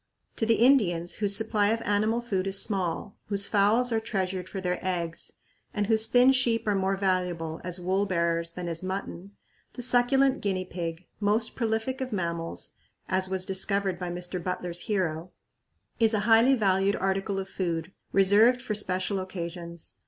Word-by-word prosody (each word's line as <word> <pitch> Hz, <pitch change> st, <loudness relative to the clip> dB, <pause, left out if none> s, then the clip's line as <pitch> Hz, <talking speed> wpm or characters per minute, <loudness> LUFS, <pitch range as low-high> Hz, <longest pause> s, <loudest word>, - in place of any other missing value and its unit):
To 225 Hz, -, 0 dB
the 230 Hz, -, +4 dB
Indians 200 Hz, -10 st, +3 dB
whose 205 Hz, -2 st, +3 dB
supply 215 Hz, -2 st, +1 dB
of 225 Hz, +2 st, 0 dB
animal 215 Hz, +3 st, +1 dB
food 195 Hz, -5 st, -2 dB
is 195 Hz, 0 st, 0 dB
small, 195 Hz, -1 st, -2 dB
whose 200 Hz, -1 st, +2 dB
fowls 220 Hz, +4 st, +3 dB
are 225 Hz, -, +2 dB
treasured 190 Hz, -4 st, -3 dB
for 195 Hz, -, -5 dB
their 180 Hz, -1 st, -2 dB
eggs, 170 Hz, -3 st, -3 dB, 0.4 s
and 205 Hz, -1 st, +1 dB
whose 220 Hz, +1 st, +2 dB
thin 245 Hz, +3 st, +5 dB
sheep 245 Hz, -3 st, +1 dB
are 210 Hz, -, +3 dB
more 195 Hz, 0 st, 0 dB
valuable 180 Hz, -4 st, -1 dB
as 180 Hz, 0 st, -4 dB
wool 190 Hz, +3 st, 0 dB
bearers 170 Hz, -2 st, 0 dB
than 180 Hz, 0 st, -5 dB
as 165 Hz, -1 st, -3 dB
mutton, 190 Hz, 0 st, -5 dB, 0.4 s
the 245 Hz, -, -6 dB
succulent 260 Hz, +3 st, +3 dB
guinea 190 Hz, -2 st, -1 dB
pig, 170 Hz, -1 st, -5 dB
"most 215 Hz, +2 st, 0 dB
prolific 230 Hz, +3 st, -1 dB
of 260 Hz, -1 st, -3 dB
mammals," 170 Hz, -4 st, -3 dB, 0.4 s
as 185 Hz, 0 st, 0 dB
was 190 Hz, -1 st, 0 dB
discovered 190 Hz, -1 st, 0 dB
by 180 Hz, -1 st, -4 dB
Mr. 175 Hz, 0 st, -5 dB
Butler's 180 Hz, -1 st, -3 dB
hero, 180 Hz, -4 st, -2 dB, 0.7 s
is 225 Hz, -1 st, +4 dB
a 205 Hz, -, +1 dB
highly 230 Hz, +5 st, +5 dB
valued 195 Hz, -2 st, +2 dB
article 195 Hz, +1 st, -1 dB
of 195 Hz, 0 st, -3 dB
food, 170 Hz, -3 st, -3 dB, 0.2 s
reserved 205 Hz, +6 st, +5 dB
for 235 Hz, -4 st, -4 dB
special 195 Hz, -1 st, -1 dB
occasions. 170 Hz, -2 st, -7 dB
195 Hz, 165 wpm, -27 LUFS, 180-220 Hz, 0.7 s, thin